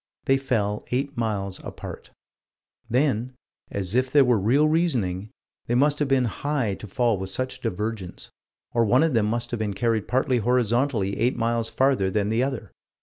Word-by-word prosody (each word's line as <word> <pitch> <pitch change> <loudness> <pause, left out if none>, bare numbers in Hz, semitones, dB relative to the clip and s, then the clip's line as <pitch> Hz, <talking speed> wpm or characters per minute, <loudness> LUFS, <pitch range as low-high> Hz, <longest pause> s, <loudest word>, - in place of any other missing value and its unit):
They 135 - +4
fell 110 -6 -1
eight 140 +3 -1
miles 100 -5 -2
apart. - - -8 0.8
Then 125 -1 +1 0.3
as 95 -1 -3
if 130 +1 +2
there 145 -2 +6
were 120 -3 +3
real 130 +10 +3
reasoning 120 - 0 0.4
they 120 - +1
must 145 +3 +3
have 145 - +1
been 135 -2 +3
high 130 -2 -1
to 105 - -8
fall 115 0 +1
with 95 0 -4
such 130 +5 -3
divergence, 105 -3 -4 0.4
or 115 - +3
one 125 +7 +4
of 165 -3 +1
them 110 -3 +2
must 120 +2 -1
have 120 - -2
been 105 -2 -2
carried 115 0 0
partly 130 0 +1
horizontally 120 -2 +1
eight 120 +3 +1
miles 115 -1 0
farther 130 -8 +2
than 105 +1 0
the 110 +2 +1
other. 130 -3 -3
120 Hz, 175 wpm, -25 LUFS, 105-130 Hz, 0.8 s, there